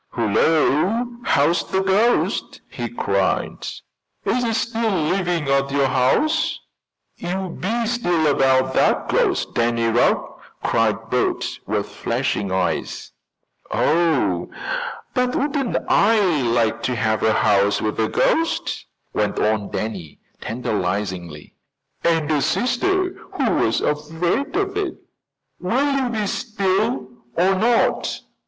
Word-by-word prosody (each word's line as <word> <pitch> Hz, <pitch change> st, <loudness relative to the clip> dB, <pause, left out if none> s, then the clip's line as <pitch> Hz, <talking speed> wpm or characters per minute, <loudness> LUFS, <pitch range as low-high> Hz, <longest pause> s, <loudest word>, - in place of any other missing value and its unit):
"Hullo! 155 Hz, -, +2 dB, 0.2 s
how's 155 Hz, +5 st, +3 dB
the 190 Hz, 0 st, -1 dB
ghost?" 205 Hz, +5 st, +1 dB
he -, -, -5 dB
cried. -, -, -1 dB, 0.6 s
"Is 250 Hz, -, +1 dB
it 225 Hz, -2 st, 0 dB
still 230 Hz, 0 st, 0 dB
living 175 Hz, -3 st, 0 dB
at 140 Hz, 0 st, +2 dB
your 140 Hz, 0 st, +2 dB
house?" 135 Hz, -, +1 dB, 0.6 s
"You 185 Hz, +2 st, -3 dB
be 230 Hz, +5 st, -1 dB
still 175 Hz, -9 st, +1 dB
about 130 Hz, -2 st, +3 dB
that -, -, +2 dB
ghost, -, -, +1 dB
Danny 115 Hz, 0 st, +1 dB
Rugg!" 115 Hz, +1 st, +2 dB, 0.4 s
cried 115 Hz, 0 st, 0 dB
Bert, 125 Hz, -, +1 dB, 0.2 s
with -, -, -1 dB
flashing 100 Hz, -2 st, -2 dB
eyes. 95 Hz, -1 st, -2 dB, 0.6 s
"Oh, 140 Hz, -, +1 dB, 0.6 s
but 250 Hz, 0 st, 0 dB
wouldn't 275 Hz, -3 st, 0 dB
I 220 Hz, +2 st, +4 dB, 0.3 s
like 115 Hz, -1 st, +1 dB
to 125 Hz, -, -1 dB
have 110 Hz, -2 st, 0 dB
a 110 Hz, -, +3 dB
house 100 Hz, -2 st, +3 dB
with 110 Hz, 0 st, -2 dB
a 110 Hz, -, +1 dB
ghost," 330 Hz, +1 st, 0 dB, 0.3 s
went -, -, 0 dB
on 105 Hz, -1 st, 0 dB
Danny 95 Hz, -8 st, -5 dB, 0.2 s
tantalizingly. 95 Hz, -8 st, -3 dB, 0.5 s
"And 165 Hz, -2 st, +1 dB
a 150 Hz, -2 st, +2 dB
sister 365 Hz, -, +1 dB, 0.2 s
who -, -, +1 dB
was -, -, +1 dB
afraid 165 Hz, -, -1 dB
of 390 Hz, 0 st, -1 dB
it!" 385 Hz, -5 st, -2 dB, 0.6 s
"Will 255 Hz, +11 st, +1 dB
you 265 Hz, -2 st, 0 dB
be 220 Hz, -3 st, -1 dB
still, 195 Hz, -, -1 dB, 0.3 s
or 185 Hz, +3 st, +4 dB
not?" 230 Hz, +5 st, +1 dB
160 Hz, 120 wpm, -21 LUFS, -, 0.6 s, I